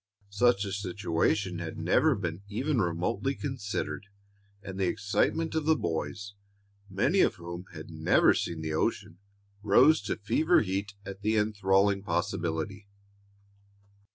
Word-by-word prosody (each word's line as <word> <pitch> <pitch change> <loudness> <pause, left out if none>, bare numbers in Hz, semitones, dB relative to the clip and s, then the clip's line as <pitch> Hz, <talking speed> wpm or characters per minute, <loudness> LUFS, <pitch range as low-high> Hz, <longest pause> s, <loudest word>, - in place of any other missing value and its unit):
Such 105 0 +3
a 100 - -4
situation 95 -1 -1
had 85 -2 -6
never 125 - +3
been 90 -3 -4
even 125 +5 0
remotely 95 +10 -1
considered, 105 -6 -4 0.6
and 95 0 -7
the 95 - +2
excitement 105 - 0
of 160 -2 -1
the 160 0 +4
boys, 85 - -4 0.6
many 120 - +1
of - - +4
whom 85 0 -8
had - - -9
never - - +4
seen 85 -2 -3
the 80 0 -3
ocean, 85 +2 -2 0.4
rose 135 +8 +5
to - - -1
fever 155 - +2
heat 100 0 -3
at 100 0 -8
the 110 +2 +1
enthralling 100 -1 +2
possibility. 85 +1 -2
100 Hz, 130 wpm, -29 LUFS, 90-110 Hz, 0.6 s, rose